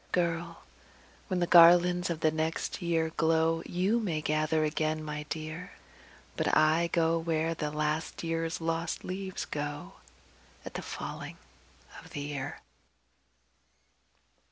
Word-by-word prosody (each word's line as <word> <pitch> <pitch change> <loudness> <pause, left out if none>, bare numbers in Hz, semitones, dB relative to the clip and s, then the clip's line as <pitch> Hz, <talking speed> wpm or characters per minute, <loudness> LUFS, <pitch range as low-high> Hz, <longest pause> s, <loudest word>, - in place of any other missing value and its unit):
Girl! 170 -1 -1 0.6
when 185 -2 -1
the - - +3
garlands 175 +1 +7
of 165 -2 -3
next 160 +4 0
year 165 -2 0
glow, 165 0 +2
YOU 190 +6 +1
may 175 -9 -1
gather 155 +1 +1
again, 155 0 -1
my 150 0 -5
dear 160 +4 -5 0.6
But - - +2
I 160 +2 +4
go 165 0 +2
where 165 0 0
the 150 -2 -3
last 150 +2 -2
year's 165 0 -2
lost 165 +1 -2
leaves 190 0 -4
go 145 0 -5 0.7
At - - -7
the - - -4
falling - - -6 0.6
of - - -14
the 145 - -4
year." 145 -1 -5
165 Hz, 125 wpm, -30 LUFS, 155-170 Hz, 0.7 s, garlands